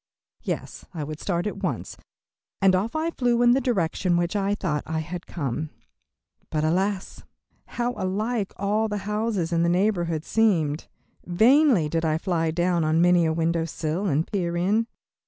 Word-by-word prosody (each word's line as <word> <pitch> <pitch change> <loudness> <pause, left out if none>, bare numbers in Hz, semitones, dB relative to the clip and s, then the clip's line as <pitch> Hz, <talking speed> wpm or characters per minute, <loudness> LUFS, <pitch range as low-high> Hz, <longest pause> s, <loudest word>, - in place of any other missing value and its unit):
Yes, - - -5
I 155 - -3
would 155 +1 -6
start 175 -2 -1
at 210 - -4
once, - - -3 0.6
and 195 -1 +4
off 210 +8 -1
I 320 +2 0
flew 245 -4 +1
in 240 - +6
the 265 +2 +3
direction 185 -6 0
which 175 +3 -1
I 200 0 +1
thought 155 -8 -2
I 160 - -2
had 170 +3 -5
come. 155 -1 -3 0.8
But, 155 -1 -1
alas! 190 +4 -1 0.5
how 240 0 0
alike 205 +3 -2
all 210 +3 +1
the 210 -1 -3
houses 210 -5 -1
in 165 - +2
that 170 - +2
neighborhood 175 -4 +1
seemed. 170 -9 +1 0.4
Vainly 225 - +4
did 165 +2 -1
I 155 -1 +1
fly 165 -2 0
down 175 +1 +1
on 155 +1 +2
many 175 -1 +4
a - - +1
window 165 0 0
sill 165 +4 -2
and 155 0 +1
peer 175 -4 -2
in. 210 +6 +1
180 Hz, 170 wpm, -25 LUFS, 165-210 Hz, 0.8 s, in